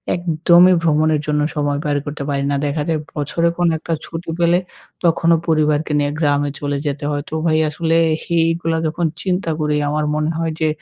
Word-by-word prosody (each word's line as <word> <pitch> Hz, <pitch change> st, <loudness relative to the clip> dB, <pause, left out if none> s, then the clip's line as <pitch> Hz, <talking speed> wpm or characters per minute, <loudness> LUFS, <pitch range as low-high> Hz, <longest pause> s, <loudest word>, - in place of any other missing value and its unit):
একদমই 175 Hz, +1 st, +4 dB
ভ্রমণের 155 Hz, -1 st, +2 dB
জন্য 150 Hz, 0 st, +1 dB
সময় 145 Hz, -1 st, 0 dB
বাইর 145 Hz, -2 st, 0 dB
করতে 145 Hz, -1 st, -5 dB
পারি। 140 Hz, -1 st, -1 dB
না 140 Hz, -, +1 dB
দেখা 145 Hz, +1 st, -1 dB
যায় 160 Hz, -2 st, +1 dB, 0.2 s
বছরে 155 Hz, +3 st, 0 dB
কোন 175 Hz, 0 st, +2 dB
একটা 165 Hz, +1 st, -4 dB
ছুটি 165 Hz, +1 st, -7 dB
পেলে 170 Hz, +1 st, +3 dB, 0.4 s
তখনও 170 Hz, 0 st, +3 dB
পরিবারকে 155 Hz, -1 st, +1 dB
নিয়ে 145 Hz, 0 st, 0 dB
গ্রামে 145 Hz, -2 st, +1 dB
চলে 145 Hz, -1 st, -2 dB
যেতে 145 Hz, 0 st, -3 dB
হয়। 145 Hz, -1 st, -2 dB
তো -, -, -10 dB
ভাই 160 Hz, -1 st, +3 dB
আসলে 165 Hz, +2 st, -1 dB, 0.3 s
এইগুলা 165 Hz, 0 st, 0 dB
যখন 165 Hz, +2 st, -2 dB, 0.2 s
চিন্তা 180 Hz, -2 st, -1 dB
করি 150 Hz, -1 st, 0 dB
আমার 150 Hz, 0 st, -1 dB
মনে 155 Hz, 0 st, 0 dB
হয় 165 Hz, -1 st, -1 dB
যে 160 Hz, -, +2 dB
155 Hz, 185 wpm, -19 LUFS, 145-165 Hz, 0.4 s, একদমই